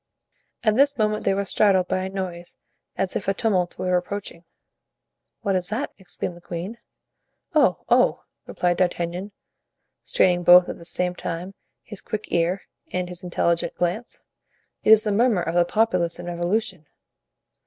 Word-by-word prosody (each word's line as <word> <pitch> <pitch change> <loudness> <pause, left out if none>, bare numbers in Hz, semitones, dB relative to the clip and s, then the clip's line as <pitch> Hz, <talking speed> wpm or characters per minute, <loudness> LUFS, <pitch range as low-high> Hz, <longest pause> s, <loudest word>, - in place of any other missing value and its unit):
At 215 -2 +3
this 280 +2 +4
moment 215 -1 0
they - - +3
were 200 0 -1
startled 190 -2 +3
by 185 - 0
a 190 - -3
noise 180 -3 -5 0.4
as 190 -1 -2
if 190 - -3
a 195 - +1
tumult 185 -5 0
were 180 0 0
approaching. 180 -2 -6 1.0
"What 200 -3 0
is 180 -1 -1
that?" 235 +8 -2
exclaimed 175 -1 -5
the 175 - -15
queen. 180 +7 -6 0.7
"Oh, - - +3
oh!" - - +3 0.2
replied 175 -1 0
D'Artagnan, 180 +2 -1 0.7
straining 175 -1 +2
both 175 +1 +7
at - - -6
the 170 - -11
same 180 +1 0
time 175 +2 -5 0.3
his 210 -3 -9
quick 215 -1 -5
ear 175 +3 +1 0.3
and 180 -1 -2
his 180 +1 -8
intelligent 170 -1 0
glance, 180 +7 -3 0.6
"it - - +1
is 220 0 +8
the 210 - 0
murmur 215 -3 +2
of 165 - -2
the 175 0 +4
populace 180 -5 +1
in 175 - -8
revolution." 175 -1 -2
180 Hz, 160 wpm, -24 LUFS, 175-205 Hz, 1.0 s, is